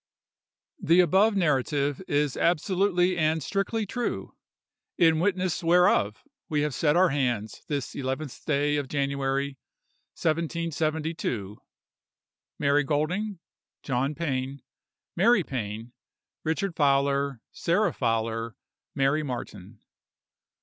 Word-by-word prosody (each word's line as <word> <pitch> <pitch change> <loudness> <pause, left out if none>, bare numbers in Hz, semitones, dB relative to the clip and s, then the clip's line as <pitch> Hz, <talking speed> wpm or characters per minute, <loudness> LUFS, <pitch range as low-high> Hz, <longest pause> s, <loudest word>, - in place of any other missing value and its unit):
"The 170 +3 +4
above 190 +5 +4
narrative 145 -4 +1
is 145 -2 +1
absolutely 180 +1 +2
and 155 0 +1
strictly 205 +5 -1
true, 240 +4 -4 0.6
in 160 -2 +4
witness 185 -2 0
whereof 165 - +3 0.3
we 150 -1 +1
have 150 -1 -1
set 150 +2 +2
our 180 +1 +5
hands 120 -7 -1
this 140 -5 -3
eleventh 135 +1 -4
day 145 0 +1
of 145 -2 -2
January, 140 0 -1 0.6
1772:— 160 - -2 1.0
"MARY 145 0 +3
GOLDING, 175 +9 -1 0.5
"JOHN 135 +2 -1
PAIN, 135 -4 -3 0.5
"MARY 205 +2 +4
PAIN, 115 -3 -5 0.5
"RICHARD 165 +3 -1
FOWLER, 140 -2 +2
"SARAH 185 +5 +1
FOWLER, 115 -2 -1 0.4
"MARY 140 +3 +2
MARTIN." 110 -6 -7
150 Hz, 100 wpm, -27 LUFS, 135-170 Hz, 1.0 s, our